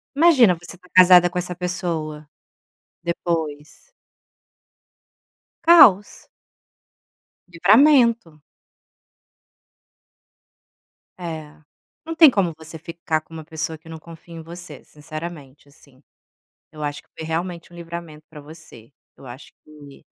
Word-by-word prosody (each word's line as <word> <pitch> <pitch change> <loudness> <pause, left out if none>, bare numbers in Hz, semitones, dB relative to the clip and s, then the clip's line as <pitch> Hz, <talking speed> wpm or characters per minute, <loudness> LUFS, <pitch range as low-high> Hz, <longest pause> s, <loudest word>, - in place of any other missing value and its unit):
Imagina 275 - +5
você 175 +2 -12
tá 180 0 -24
casada 180 -1 +7
com 180 - -7
essa 180 0 -5
pessoa 170 -4 -4 0.8
depois. 165 - -5 1.7
Caos. 230 - +5 1.2
Livramento. 225 - +3 2.8
É, 160 -4 -7 0.5
não 330 - -6
tem 320 -3 +8
como 185 -8 -1
você 160 0 -11
ficar 160 0 -4
com 160 - -20
uma 160 -1 -8
pessoa 160 +1 -5
que 165 +1 -18
não 160 - -8
confia 165 +1 -14
em 165 - -8
você, 170 -3 -11
sinceramente, 150 -2 -10
assim, 140 -1 -23 0.7
eu 150 - -8
acho 145 0 -5
que - - -39
foi 160 - -7
realmente 170 +1 -5
um - - -15
livramento 170 -2 -10
pra 150 -2 -12
você, 150 -6 -15 0.2
eu - - -16
acho 125 +3 -12
que 145 -2 -16
165 Hz, 115 wpm, -21 LUFS, 155-180 Hz, 2.8 s, tem